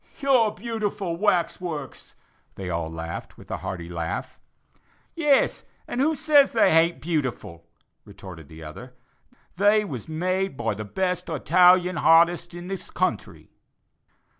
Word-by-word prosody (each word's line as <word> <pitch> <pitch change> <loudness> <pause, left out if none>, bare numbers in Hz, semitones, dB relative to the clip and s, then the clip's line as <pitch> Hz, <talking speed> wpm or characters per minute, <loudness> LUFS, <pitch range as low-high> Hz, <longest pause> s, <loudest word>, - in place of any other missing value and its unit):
"Your 260 -7 +3
beautiful 205 -4 -3
wax 180 -2 +1
works!" 155 -6 -7 0.4
they 95 -2 -5
all 85 -1 -2
exclaimed, 80 0 -6
with - - -13
a - - -2
hearty 85 -3 -6
laugh. 85 +1 -5 0.7
"Yes, 295 -5 +2 0.2
and 245 - -2
who 315 +3 +2
says 300 -3 +4
they 225 - +4
haint 165 -1 +3
beautiful?" 130 - -3 0.4
retorted 85 -5 -12
the 80 +1 -12
other; 125 +12 -10 0.6
"they 210 +2 +4
was 135 - -7
made 185 +1 -1
by 115 -2 -1
the 105 +1 -6
best 180 - -2
Hitalian 180 +3 +4
hartist 170 +1 +4
in 175 +1 -8
this 195 -1 -6
country." - - -3
175 Hz, 135 wpm, -24 LUFS, -, 0.7 s, says